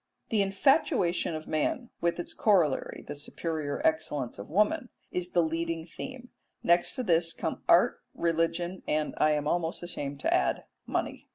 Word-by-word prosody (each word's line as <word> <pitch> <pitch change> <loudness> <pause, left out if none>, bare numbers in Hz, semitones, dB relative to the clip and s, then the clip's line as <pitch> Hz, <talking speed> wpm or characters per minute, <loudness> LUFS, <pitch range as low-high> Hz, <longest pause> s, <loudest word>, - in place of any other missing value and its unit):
The 215 -2 +3
infatuation 195 - +2
of 155 0 -6
man, 195 - -1
with 170 0 +1
its 175 - -4
corollary, 175 -10 +2
the 145 - -4
superior 150 0 -3
excellence 150 -7 0
of 100 - -8
woman, 240 - +2 0.2
is 180 0 -3
the 175 - +4
leading 165 0 -2
theme; 250 +8 -8 0.3
next 175 +1 +4
to 255 - -2
this 165 -4 +2
come - - -3
art, - - +5
religion, 170 +2 0
and, 155 0 0
I 155 0 +4
am 150 -1 -1
almost 170 +1 -1
ashamed 145 -5 -5
to - - +2
add, - - +1 0.2
money. - - -3
170 Hz, 160 wpm, -29 LUFS, 155-190 Hz, 0.3 s, art